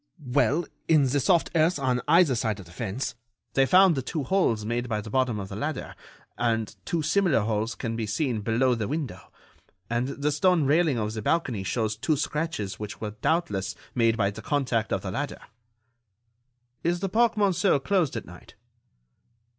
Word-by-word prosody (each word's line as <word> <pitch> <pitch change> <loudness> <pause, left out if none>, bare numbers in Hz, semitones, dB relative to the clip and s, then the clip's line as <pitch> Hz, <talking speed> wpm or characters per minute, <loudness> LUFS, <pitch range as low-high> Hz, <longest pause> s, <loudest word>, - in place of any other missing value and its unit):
"Well, 160 +7 +2 0.2
in 155 -3 +5
the 135 +2 +1
soft 170 +5 +2
earth 165 +2 +3
on 130 -3 0
either 165 -2 +5
side 110 -3 -1
of 95 - -10
the 85 - -15
fence, 110 +7 -4 0.4
they 135 0 +3
found 185 +2 +6
the 135 - -1
two 150 +3 -3
holes 125 - +1
made 120 +2 -2
by 110 -2 0
the 105 0 -8
bottom 130 -4 +1
of 95 - -5
the 100 - -6
ladder, 145 +6 -4 0.5
and 115 -2 0
two 165 -2 -1
similar 160 - +2
holes 110 +2 -1
can 115 -3 -4
be 115 -1 -3
seen 115 0 -1
below 120 +4 +2
the 110 -3 -2
window. 140 - -5 0.6
And 120 +2 0
the 140 +2 -1
stone 165 +2 +3
railing 150 -1 +3
of 110 -1 -2
the 110 - -4
balcony 130 -6 0
shows 110 +2 -1
two 150 +8 0
scratches 150 - -3
which 105 -1 -6
were 105 -1 -4
doubtless 105 - -1 0.2
made 115 -2 +2
by 100 -2 +1
the - - -9
contact 125 -6 0
of 95 - -1
the 95 - -4
ladder." 145 +8 -3 1.5
"Is 175 +1 0
the 195 - 0
Parc 230 +4 +2
Monceau 195 -5 +3
closed 170 -1 +1
at - - -6
night?" 90 0 -14
130 Hz, 185 wpm, -26 LUFS, 110-160 Hz, 1.5 s, found